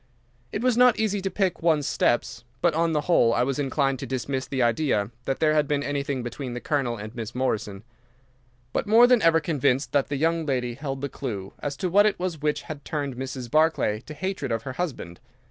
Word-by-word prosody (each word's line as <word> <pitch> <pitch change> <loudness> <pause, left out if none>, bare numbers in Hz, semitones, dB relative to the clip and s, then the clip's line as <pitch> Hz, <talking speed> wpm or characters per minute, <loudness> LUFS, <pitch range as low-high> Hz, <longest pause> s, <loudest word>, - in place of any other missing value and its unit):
It 205 - -3
was 250 -2 +3
not 250 -1 +5
easy 205 -2 0
to 195 - -1
pick 190 -1 -1
one's 160 -4 +2
steps, 120 -3 0 0.2
but, 170 +4 +2
on 165 +1 +1
the 150 - +1
whole, 120 -8 +3
I 120 - +2
was 135 +2 -1
inclined 135 -1 0
to - - -5
dismiss 130 0 -3
the 130 -2 0
idea 115 -3 +1
that 135 - -1
there 155 -1 +3
had 150 -2 +2
been 145 -1 0
anything 140 -2 -2
between 120 +1 -5
the - - -3
Colonel 130 -4 -1
and 110 +2 -8
Miss 120 -1 -6
Morrison, 110 -6 -2 0.9
but - - -1
more 225 +3 +7
than 245 -2 +4
ever 165 -2 +5
convinced 140 -5 0
that 140 -2 +2
the 145 - -2
young 165 +3 +1
lady 125 -5 -1
held 135 +1 -5
the 140 - -1
clue 105 -9 -6
as 145 -1 -4
to 185 - -1
what 205 +4 +5
it 210 - 0
was 180 -4 -3
which 150 -1 0
had 145 -2 -8
turned 145 -4 -3
Mrs. 130 -1 -6
Barclay 155 -8 +2
to 155 - -8
hatred 185 -4 -3
of 115 0 -1
her 130 - -5
husband. 130 - -5
140 Hz, 220 wpm, -25 LUFS, 125-165 Hz, 0.9 s, more